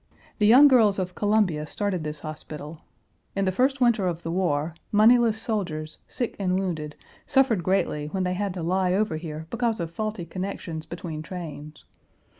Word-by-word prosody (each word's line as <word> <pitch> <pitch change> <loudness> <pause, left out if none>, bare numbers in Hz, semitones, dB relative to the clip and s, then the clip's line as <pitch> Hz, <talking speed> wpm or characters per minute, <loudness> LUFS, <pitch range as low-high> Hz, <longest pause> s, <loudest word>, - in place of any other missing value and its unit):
The 210 - +4
young 260 +6 +9
girls 225 -7 +5
of 185 -1 -3
Columbia 205 -8 +1
started 195 -1 -2
this 150 -1 -5
hospital. 155 0 -8 0.5
In 195 0 +1
the 185 - +2
first 260 +7 +1
winter 235 -6 +3
of 170 -1 -3
the 165 - -3
war, 165 -3 0 0.2
moneyless 225 +1 +5
soldiers, 170 -9 -3
sick 245 -3 -3
and 185 -2 +1
wounded, 155 -6 -3 0.3
suffered 265 -8 +3
greatly 165 -5 0
when 190 +4 -2
they 180 0 0
had 195 0 -2
to 175 - -4
lie 180 +1 +1
over 195 -5 +1
here 155 -1 -6
because 235 -2 0
of 165 -1 -3
faulty 215 -1 -4
connections 170 -3 -5
between 165 -3 -6
trains. 155 -3 -8
185 Hz, 170 wpm, -25 LUFS, 160-215 Hz, 0.5 s, young